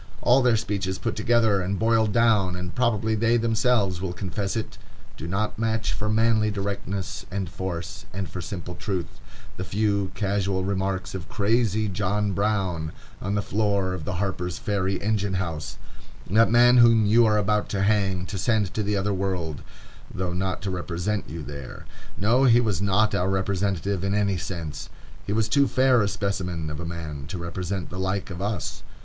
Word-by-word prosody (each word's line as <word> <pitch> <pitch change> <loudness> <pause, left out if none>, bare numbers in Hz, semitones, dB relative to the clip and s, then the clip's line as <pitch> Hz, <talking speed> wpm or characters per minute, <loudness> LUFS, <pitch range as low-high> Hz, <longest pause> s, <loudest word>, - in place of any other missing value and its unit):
All 125 +2 +5
their 120 -3 +4
speeches 95 -3 -2
put 115 - -2
together 110 -3 +3
and 95 +2 -1
boiled 110 -1 +3
down,—and 95 -6 +2
probably 110 -3 +1
they 115 +2 +3
themselves 115 -5 +1
will 95 -2 -2
confess 95 +3 -3
it,—do 110 -6 -8
not 100 +4 -2
match 110 -5 0
for 105 +2 -2
manly 110 0 +3
directness 100 -4 -3
and 95 -1 -3
force, 85 -1 -5
and 95 -1 -4
for 90 +3 -6
simple 90 -2 -6
truth, 95 -5 -4 0.4
the 95 - -3
few 100 -1 0
casual 100 -2 0
remarks 95 -1 -2
of 95 -1 -6
crazy 110 0 +1
John 100 +1 0
Brown, 95 -6 -1 0.3
on 100 +1 -1
the 100 - 0
floor 100 -3 0
of 90 -4 -5
the 100 - -2
Harper's 90 -2 -2
Ferry 95 -2 -1
engine 100 -2 0
house,—that 90 +5 -2
man 120 +2 +6
whom 115 -2 +6
you 115 +2 +5
are 105 -1 +3
about 105 0 +1
to 100 -2 0
hang, 100 -3 +1
to 100 0 -5
send 105 0 +1
to 110 - -1
the 105 0 0
other 100 +1 0
world, 90 -6 -2 0.5
though 90 -1 -3
not 95 +1 -2
to 100 - -2
represent 90 +3 -2
you 80 +1 -6
there. 70 -2 -8 0.3
No, 120 +6 +3
he 120 -2 +6
was 105 -7 0
not 100 +2 +2
our 90 +2 +1
representative 95 0 0
in 100 +1 0
any 100 -2 +1
sense. 85 -4 -5 0.4
He - - -2
was 110 0 +2
too 140 +5 +3
fair 130 -2 +4
a 100 - +2
specimen 95 -6 -2
of 75 - -5
a 85 - -4
man 80 -4 -6
to 90 - -5
represent 90 +1 -4
the 90 - -5
like 95 +1 -2
of 90 +1 -6
us. 100 -3 -3
100 Hz, 175 wpm, -25 LUFS, 90-110 Hz, 0.5 s, man